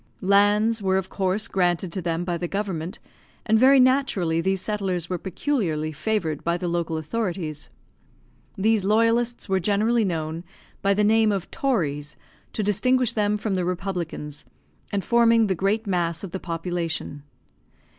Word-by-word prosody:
Lands 205 Hz, +3 st, +3 dB
were 190 Hz, -1 st, +2 dB
of 190 Hz, -1 st, -3 dB
course 195 Hz, +2 st, 0 dB
granted 175 Hz, -1 st, 0 dB
to 190 Hz, -, -4 dB
them 165 Hz, 0 st, -1 dB
by 175 Hz, -1 st, -1 dB
the 175 Hz, +1 st, -3 dB
government, 185 Hz, -4 st, -3 dB, 0.5 s
and 220 Hz, 0 st, +3 dB
very 265 Hz, +2 st, +6 dB
naturally 250 Hz, -11 st, +2 dB
these 190 Hz, +2 st, 0 dB
settlers 185 Hz, -4 st, -2 dB
were 180 Hz, -, -1 dB
peculiarly 180 Hz, -, -1 dB
favoured 160 Hz, -2 st, -2 dB
by 170 Hz, +1 st, 0 dB
the 175 Hz, -, -3 dB
local 170 Hz, -1 st, -1 dB
authorities. 165 Hz, -3 st, -3 dB, 0.9 s
These 215 Hz, +1 st, +2 dB
loyalists 230 Hz, +4 st, +2 dB
were 190 Hz, -1 st, +1 dB
generally 215 Hz, +5 st, +2 dB
known 165 Hz, -3 st, -3 dB, 0.4 s
by 200 Hz, 0 st, +2 dB
the 210 Hz, -, +2 dB
name 220 Hz, +1 st, +4 dB
of 195 Hz, -3 st, -3 dB
"tories," 150 Hz, -, -1 dB, 0.4 s
to 215 Hz, -, -2 dB
distinguish 245 Hz, +4 st, +2 dB
them 210 Hz, -1 st, +1 dB
from 210 Hz, -1 st, -2 dB
the 185 Hz, -1 st, 0 dB
republicans, 175 Hz, -5 st, -4 dB, 0.5 s
and 200 Hz, -1 st, -1 dB
forming 230 Hz, -1 st, +4 dB
the 195 Hz, -, +1 dB
great 200 Hz, +5 st, 0 dB
mass 170 Hz, -3 st, -1 dB
of 190 Hz, -, -6 dB
the 190 Hz, -, -4 dB
population. 165 Hz, -4 st, -3 dB
190 Hz, 155 wpm, -24 LUFS, 170-215 Hz, 0.9 s, very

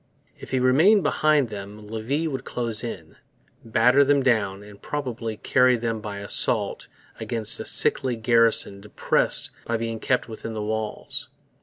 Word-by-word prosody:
If -, -, -10 dB
he 130 Hz, -, 0 dB
remained 160 Hz, +11 st, +4 dB
behind 150 Hz, -3 st, +2 dB
them 105 Hz, 0 st, -9 dB
Levis 120 Hz, +9 st, -2 dB
would 135 Hz, -4 st, -4 dB
close 115 Hz, -2 st, -2 dB
in, 85 Hz, -9 st, -7 dB, 0.5 s
batter 125 Hz, +5 st, +4 dB
them 140 Hz, 0 st, +2 dB
down, 105 Hz, -6 st, +1 dB
and 105 Hz, -1 st, -14 dB
probably 120 Hz, -6 st, -4 dB
carry 125 Hz, +1 st, +3 dB
them 115 Hz, -1 st, -3 dB
by 105 Hz, -2 st, -6 dB
assault 100 Hz, 0 st, -2 dB, 0.3 s
against 115 Hz, -2 st, 0 dB
a -, -, -5 dB
sickly 130 Hz, -2 st, +2 dB
garrison 115 Hz, -3 st, +2 dB
depressed 105 Hz, 0 st, 0 dB
by 115 Hz, -, -1 dB
being 115 Hz, 0 st, -4 dB
kept 125 Hz, +2 st, 0 dB
within 115 Hz, 0 st, -7 dB
the 105 Hz, -, -3 dB
walls. 110 Hz, 0 st, -4 dB
115 Hz, 150 wpm, -24 LUFS, 110-130 Hz, 0.5 s, remained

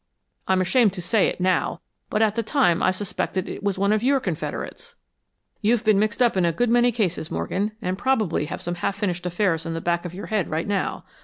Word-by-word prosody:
I'm 190 Hz, 0 st, +3 dB
ashamed 210 Hz, +2 st, +3 dB
to 185 Hz, -, -5 dB
say 210 Hz, +3 st, +3 dB
it, -, -, -3 dB
now, 180 Hz, -1 st, +1 dB, 0.3 s
but 215 Hz, -, +2 dB
at 215 Hz, -2 st, +2 dB
the 230 Hz, -, 0 dB
time 220 Hz, -, +2 dB
I -, -, +4 dB
suspected 185 Hz, -1 st, -3 dB
it -, -, -6 dB
was 200 Hz, -1 st, -1 dB
one 200 Hz, +2 st, +2 dB
of 215 Hz, -, +1 dB
your 270 Hz, +3 st, +3 dB
confederates." 255 Hz, -, -5 dB, 0.7 s
"You've 225 Hz, +2 st, +2 dB
been 215 Hz, -3 st, +4 dB
mixed 215 Hz, +3 st, +1 dB
up 240 Hz, -, +2 dB
in 185 Hz, -, +2 dB
a 170 Hz, -, +3 dB
good 235 Hz, +8 st, 0 dB
many 240 Hz, +1 st, +4 dB
cases, 185 Hz, -8 st, -1 dB
Morgan, 190 Hz, -, -2 dB
and 185 Hz, +1 st, -2 dB
probably 215 Hz, -, +1 dB
have 150 Hz, -, -6 dB
some 175 Hz, -, -2 dB
half 195 Hz, -, 0 dB
finished 180 Hz, -3 st, -2 dB
affairs 175 Hz, -2 st, 0 dB
in 165 Hz, 0 st, -4 dB
the -, -, -2 dB
back 170 Hz, +1 st, 0 dB
of 175 Hz, -1 st, -7 dB
your 200 Hz, -, -6 dB
head 210 Hz, -5 st, -1 dB
right 160 Hz, +2 st, -1 dB
now. 200 Hz, -1 st, -2 dB
200 Hz, 230 wpm, -24 LUFS, 175-220 Hz, 0.7 s, I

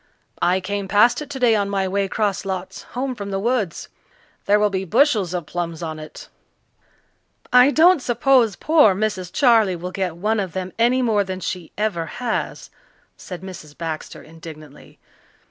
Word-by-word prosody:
"I 180 Hz, +2 st, +3 dB
came 200 Hz, +1 st, -3 dB
past 210 Hz, +8 st, +4 dB
it 295 Hz, -, -8 dB
today 255 Hz, -5 st, +2 dB
on 200 Hz, -1 st, 0 dB
my 195 Hz, -1 st, 0 dB
way 195 Hz, +1 st, 0 dB
'cross 205 Hz, 0 st, -1 dB
lots 190 Hz, -1 st, -5 dB, 0.2 s
home 260 Hz, +1 st, -1 dB
from 200 Hz, -4 st, -7 dB
the 195 Hz, -, -2 dB
woods. 215 Hz, -4 st, -1 dB, 0.6 s
There 205 Hz, +1 st, +4 dB
will 210 Hz, -1 st, +2 dB
be 190 Hz, -1 st, -2 dB
bushels 215 Hz, -, +2 dB
of 175 Hz, -3 st, -3 dB
plums 170 Hz, 0 st, -4 dB
on 160 Hz, -1 st, -5 dB
it." 155 Hz, -, -10 dB, 1.3 s
"I 250 Hz, +2 st, +7 dB
don't 330 Hz, +2 st, +5 dB
suppose 245 Hz, -3 st, +2 dB
poor 300 Hz, -, +4 dB
Mrs. 190 Hz, -3 st, -2 dB
Charley 225 Hz, -8 st, +4 dB
will 180 Hz, +2 st, -6 dB
get 185 Hz, -3 st, -3 dB
one 215 Hz, +4 st, 0 dB
of 190 Hz, -4 st, -3 dB
them 185 Hz, 0 st, -5 dB
any 250 Hz, +3 st, +3 dB
more 215 Hz, -4 st, +2 dB
than 190 Hz, -1 st, -5 dB
she 180 Hz, -2 st, -5 dB
ever 195 Hz, -6 st, -1 dB
has," 240 Hz, -3 st, -3 dB, 0.4 s
said 180 Hz, -2 st, -9 dB
Mrs. 170 Hz, -6 st, -10 dB
Baxter 160 Hz, -2 st, -6 dB
indignantly. 155 Hz, -1 st, -13 dB
200 Hz, 165 wpm, -21 LUFS, 180-230 Hz, 1.3 s, I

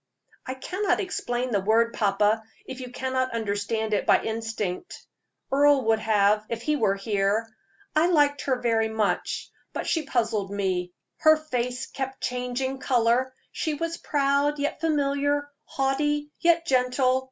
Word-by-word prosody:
"I 260 Hz, -, -3 dB
cannot 380 Hz, +9 st, -1 dB
explain 250 Hz, -10 st, -2 dB
the 205 Hz, -, +2 dB
word, 230 Hz, +3 st, +2 dB
papa, 210 Hz, +1 st, +2 dB, 0.2 s
if 260 Hz, -, -7 dB
you 250 Hz, -1 st, -6 dB
cannot 260 Hz, 0 st, -2 dB
understand 215 Hz, 0 st, -1 dB
it 205 Hz, -, 0 dB
by -, -, +5 dB
instinct. 225 Hz, -, -4 dB, 0.5 s
Earle 285 Hz, 0 st, +5 dB
would 220 Hz, 0 st, +2 dB, 0.5 s
if 230 Hz, 0 st, -4 dB
he 300 Hz, +2 st, +1 dB
were 215 Hz, -8 st, +2 dB
here. 200 Hz, +2 st, 0 dB, 0.5 s
I 315 Hz, +2 st, +4 dB
liked 290 Hz, -5 st, +3 dB
her 260 Hz, -2 st, +1 dB
very 225 Hz, -2 st, +2 dB
much; 220 Hz, -2 st, -1 dB, 0.2 s
but -, -, -3 dB
she 325 Hz, -, +1 dB
puzzled 220 Hz, -6 st, 0 dB
me; 185 Hz, -3 st, -1 dB, 0.3 s
her 315 Hz, 0 st, +6 dB
face 250 Hz, -5 st, -3 dB
kept 265 Hz, -1 st, -5 dB
changing 250 Hz, +2 st, -2 dB
color: 255 Hz, 0 st, +2 dB, 0.2 s
she 310 Hz, -2 st, -2 dB
was 330 Hz, +2 st, -3 dB
proud, 285 Hz, +1 st, +1 dB
yet 290 Hz, +1 st, -2 dB
familiar; 290 Hz, -2 st, 0 dB
haughty, 295 Hz, +2 st, 0 dB
yet 340 Hz, -1 st, +3 dB
gentle. 255 Hz, -1 st, +2 dB
255 Hz, 140 wpm, -26 LUFS, 225-290 Hz, 0.5 s, her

